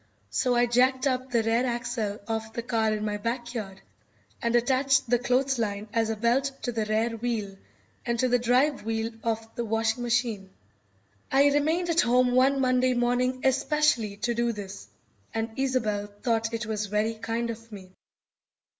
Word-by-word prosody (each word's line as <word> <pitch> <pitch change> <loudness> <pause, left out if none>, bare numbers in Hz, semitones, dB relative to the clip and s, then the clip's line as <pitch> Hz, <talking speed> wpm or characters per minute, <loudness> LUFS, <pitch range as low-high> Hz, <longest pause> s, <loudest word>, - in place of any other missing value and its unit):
So 250 -2 +1
I 240 0 +4
jacked 255 +2 +2
up 260 -1 0
the 235 -2 +1
rear 225 +2 +2
axle 235 -4 -2
of 220 -1 -3
the 235 - -4
car 225 -2 +1
in 215 0 -2
my 210 -1 -1
backyard, 230 -3 -4 0.6
and 235 0 +1
attached 265 +2 +3
the 245 +1 +2
clothesline 240 -5 0
as 225 -1 +1
a 225 - -1
belt 235 +5 +2 0.2
to 245 - -1
the 225 -2 -1
rear 220 +2 +1
wheel 220 -4 -3 0.5
and 235 0 -1
to 255 - +2
the 245 0 +2
drive 255 +4 +2
wheel 225 +1 -2
of 225 -1 -2
the 235 - -3
washing 225 +1 0
machine. 230 -5 -1 0.8
I 280 +1 +5
remained 320 +5 +1
at 335 +1 +4
home 250 +1 +3
one 265 +2 +4
Monday 255 -1 +2
morning 250 +1 +1
especially 265 -6 +2
to 240 - +1
do 235 0 0
this, 205 -3 -8 0.5
and 225 0 -2
Isobel 230 -6 0 0.2
thought 225 -2 +1
it 230 -1 -3
was 210 -1 -2
very 210 +2 0
kind 230 +1 -3
of 230 0 -11
me. 190 -3 -10
235 Hz, 170 wpm, -27 LUFS, 220-255 Hz, 0.8 s, I